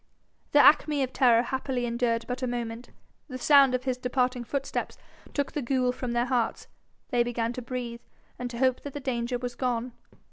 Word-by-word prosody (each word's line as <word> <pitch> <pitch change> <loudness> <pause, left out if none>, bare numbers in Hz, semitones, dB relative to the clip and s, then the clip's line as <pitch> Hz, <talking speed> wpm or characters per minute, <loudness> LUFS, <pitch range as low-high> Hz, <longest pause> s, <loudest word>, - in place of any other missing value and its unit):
The - - +5
acme 295 -1 +5
of 260 - -4
terror 240 -3 +5
happily 260 -1 -2
endured 235 -1 0
but 250 +1 -4
a 255 - 0
moment. 240 0 -4 0.4
The 255 -3 -6
sound 275 -1 +5
of 255 - -3
his 255 -1 -2
departing 250 0 0
footsteps 275 +4 -3 0.4
took 285 -1 0
the 295 - -3
ghoul 255 0 +1
from 250 -1 -4
their 240 0 +1
hearts; 245 -3 -1 0.4
they 245 -2 +2
began 235 -1 -1
to 250 - -5
breathe, 240 -1 -5 0.4
and 245 0 -3
to 235 - -7
hope 255 0 +2
that 285 - -7
the - - -3
danger 245 -2 -2
was 245 0 -5
gone. 245 -1 -2
250 Hz, 190 wpm, -27 LUFS, 240-260 Hz, 0.4 s, The